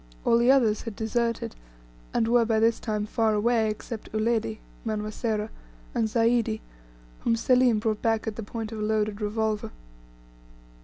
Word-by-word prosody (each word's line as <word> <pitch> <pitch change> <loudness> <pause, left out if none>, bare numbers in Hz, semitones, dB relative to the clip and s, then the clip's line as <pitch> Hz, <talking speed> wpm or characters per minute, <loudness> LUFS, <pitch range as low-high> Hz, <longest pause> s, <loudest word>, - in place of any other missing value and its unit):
All 230 - +5
the 240 +1 +3
others 235 -6 +4
had 230 -3 -6
deserted, 230 - -1 0.6
and 225 - +1
were 240 0 +4
by 225 -1 +1
this 225 +1 +3
time 210 -2 -2
far 220 0 +1
away, 225 +1 +2
except 215 +1 -6
Uledi 220 0 0 0.3
(Manwa 215 -1 -2
Sera) 220 -2 -2 0.4
and 225 - +1
Zaidi, 230 -1 +2 0.6
whom 230 - +1
Selim 250 0 +4
brought 215 0 -1
back 225 -1 +1
at 220 -2 -3
the 225 - -5
point 225 +1 -5
of 220 - -5
a - - -2
loaded 215 -1 0
revolver. 215 0 -1
220 Hz, 160 wpm, -27 LUFS, 215-230 Hz, 0.6 s, All